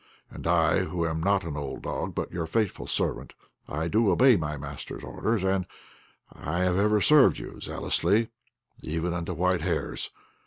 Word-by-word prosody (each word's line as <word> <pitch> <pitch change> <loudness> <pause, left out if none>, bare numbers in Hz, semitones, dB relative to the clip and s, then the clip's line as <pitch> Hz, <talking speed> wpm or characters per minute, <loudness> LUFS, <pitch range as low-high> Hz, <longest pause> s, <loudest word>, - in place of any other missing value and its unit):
And - - -6
I, 85 +2 +3
who 90 -2 -2
am 80 -1 -2
not 100 +2 +2
an 80 -3 -5
old 70 -2 -5
dog, - - -3
but - - -3
your 85 -2 -3
faithful 105 +2 -1
servant, - - -2 0.3
I 75 +3 -2
do 110 +4 +3
obey 125 +7 +6
my 75 -4 -2
master's 70 0 -7
orders, 110 -4 -1
and 95 -1 +1 0.7
I 85 +4 -3
have 90 0 +2
ever 105 +1 +3
served 150 +2 +6
you - - -8
zealously, 105 +6 0 0.5
even 80 +2 -2
unto 90 +1 -3
white 90 +1 +1
hairs. 85 -1 -2
90 Hz, 165 wpm, -27 LUFS, 80-100 Hz, 0.7 s, obey